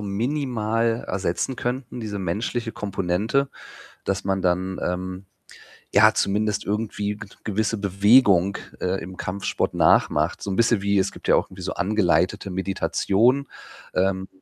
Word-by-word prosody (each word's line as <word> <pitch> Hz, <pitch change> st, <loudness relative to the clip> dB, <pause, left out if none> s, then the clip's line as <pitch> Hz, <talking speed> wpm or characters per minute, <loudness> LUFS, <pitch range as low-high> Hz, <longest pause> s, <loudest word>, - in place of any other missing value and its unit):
minimal 115 Hz, 0 st, -1 dB
ersetzen 95 Hz, +7 st, -2 dB
könnten, 125 Hz, 0 st, -4 dB
diese 105 Hz, -3 st, -4 dB
menschliche 110 Hz, +6 st, -2 dB
Komponente, 105 Hz, +7 st, -1 dB, 0.5 s
dass -, -, -2 dB
man 95 Hz, -1 st, 0 dB
dann, 95 Hz, +1 st, 0 dB
ähm, 90 Hz, +1 st, -3 dB, 0.7 s
ja -, -, +7 dB
zumindest 105 Hz, +1 st, 0 dB
irgendwie 105 Hz, 0 st, -2 dB
g 105 Hz, 0 st, -9 dB, 0.2 s
gewisse 110 Hz, +1 st, -1 dB
Bewegung, 100 Hz, -1 st, +4 dB, 0.2 s
äh, 95 Hz, +1 st, -1 dB
im 90 Hz, +2 st, -9 dB
Kampfsport 95 Hz, +2 st, -2 dB
nachmacht, -, -, +3 dB
so 100 Hz, -, -4 dB
'n 95 Hz, -, -1 dB
bisschen 115 Hz, -3 st, +3 dB
wie 100 Hz, 0 st, +2 dB
es 95 Hz, +1 st, +1 dB
gibt -, -, -12 dB
ja -, -, +5 dB
auch -, -, +1 dB
irgendwie 95 Hz, 0 st, -11 dB
so -, -, -3 dB
angeleitete 100 Hz, -1 st, +1 dB
Meditation, 100 Hz, +7 st, +1 dB, 0.5 s
ähm, 95 Hz, 0 st, 0 dB
100 Hz, 135 wpm, -24 LUFS, 95-115 Hz, 0.7 s, ja